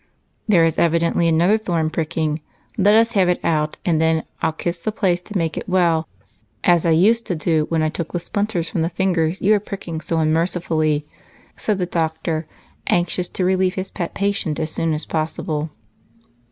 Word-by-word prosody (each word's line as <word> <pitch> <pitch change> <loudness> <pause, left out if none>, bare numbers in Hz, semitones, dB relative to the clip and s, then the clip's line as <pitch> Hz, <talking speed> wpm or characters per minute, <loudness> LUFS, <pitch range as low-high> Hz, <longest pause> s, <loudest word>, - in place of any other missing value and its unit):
"There 175 -6 +5
is 165 - 0
evidently 170 0 +2
another 170 +7 +3
thorn 170 -6 -1
pricking. 160 -1 -1 0.3
Let 205 -1 +4
us 230 +1 +4
have 190 -4 +3
it 180 - +1
out, 155 -2 0
and 160 -3 +2
then 160 0 +2 0.2
I'll - - +2
kiss 170 +2 -4
the 215 - -2
place 185 -4 0
to 205 +2 -5
make 165 -2 -1
it - - -5
well 170 -3 +2 0.6
as 175 -1 +4
I - - +3
used 215 +8 +3
to 180 - -1
do 155 0 +1
when 160 -1 +1
I 155 - +2
took 165 +1 -5
the - - -1
splinters 200 -1 -2
from 165 - -2
the 165 - +1
fingers 175 -1 0
you 205 +3 +5
are 210 - +3
pricking 190 -5 -6
so 165 - -2
unmercifully," 160 -2 +1 0.5
said 210 -2 -1
the 180 - 0
doctor, 160 -1 -2 0.4
anxious 175 +1 +1
to 185 - -2
relieve 185 0 +2
his 190 0 -4
pet 170 -2 -4
patient 200 -6 -1
as 155 0 -2
soon 165 -1 0
as 150 - -3
possible. 155 -1 -2
170 Hz, 190 wpm, -21 LUFS, 160-185 Hz, 0.6 s, There